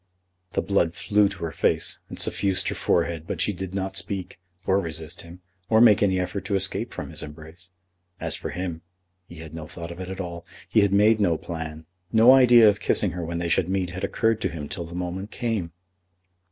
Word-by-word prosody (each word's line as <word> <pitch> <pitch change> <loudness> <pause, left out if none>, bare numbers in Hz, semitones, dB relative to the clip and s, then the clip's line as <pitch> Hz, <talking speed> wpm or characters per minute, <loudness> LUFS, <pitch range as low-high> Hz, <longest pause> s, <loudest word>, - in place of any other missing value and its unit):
The - - 0
blood 85 -4 +1
flew 100 0 +2
to - - -8
her 80 - -2
face - - +1
and - - -8
suffused 95 -2 +1
her - - -2
forehead, 85 -1 0
but - - -4
she 105 - +1
did 95 0 -6
not 95 0 -3
speak, 95 -2 -3 0.3
or 95 +1 +3
resist 80 -2 -4
him 85 +2 -13 0.3
or 110 - +5
make 110 -3 +6
any 95 -2 +2
effort 90 +1 -3
to 100 - -1
escape 95 - -1
from - - -6
his - - -3
embrace. 80 +4 -11 0.5
As - - -1
for - - -5
him, 90 -2 -4 0.5
he - - -12
had 80 -1 -10
no 80 -2 -7
thought 85 +1 -8
of 85 - -9
it 95 -1 -6
at 95 0 -6
all. 85 -2 -5 0.2
He 110 - +3
had 100 -1 +2
made 105 +2 +4
no 85 -6 +2
plan. 80 -2 -7 0.3
No 115 +3 +7
idea 120 -4 +7
of 105 -1 +3
kissing 100 -1 +2
her 90 +1 -5
when 85 +1 -4
they 85 0 -2
should 85 +1 +1
meet 95 -2 -1
had 90 +1 -7
occurred 115 -1 +1
to - - 0
him 75 -3 -6
till 85 - -5
the 85 +1 -9
moment 90 +3 -4
came. 110 -10 -3
90 Hz, 220 wpm, -25 LUFS, 85-100 Hz, 0.5 s, No